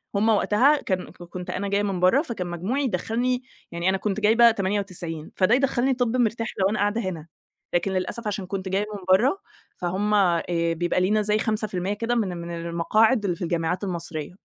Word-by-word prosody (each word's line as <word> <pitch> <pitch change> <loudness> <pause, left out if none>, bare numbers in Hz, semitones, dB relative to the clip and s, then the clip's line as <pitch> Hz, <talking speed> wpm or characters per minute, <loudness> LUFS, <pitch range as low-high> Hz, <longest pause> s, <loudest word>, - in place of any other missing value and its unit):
هم 215 +3 +2
وقتها 235 +7 +3
كان 185 -1 -2
كنت 175 +1 -9
أنا 200 +1 -2
جايّة 200 +1 +1
من 195 -3 -1
برّه، 185 +11 +4
فكان 230 - -5
مجموعي 190 +12 -2
يدخلني 250 +1 -1 0.3
يعني 170 +2 0
أنا 195 - +1
كنت 200 +1 -2
جايبة 225 +3 +6
98 185 -6 -3
فده 195 +6 +4
يدخلني 265 -1 +1
طِب 245 -1 0
مرتاح 230 -1 0
لو 190 - +3
أنا 215 - -2
قاعدة 205 +3 +1
هنا، 170 -6 -5 0.5
لكن 175 +3 +1
للأسف 190 +4 -3
عشان 200 -2 -3
كنت 190 0 -4
جايّة 195 +2 0
من - - -6
برّه، 260 - +4 0.4
فهم 190 +4 -1
آآ 180 -5 +3 0.3
بيبقى 175 +2 0
لينا 210 +3 +2
زي 210 +1 +1
5% 210 -3 -1
كده 230 +3 -1
من 190 -6 -1
من 170 0 -6
المقاعد 215 +7 +2
اللي 180 -3 0
في - - -17
الجامعات 170 +2 -1
المصريّة، 170 -5 -3
200 Hz, 185 wpm, -24 LUFS, 180-225 Hz, 0.5 s, جايبة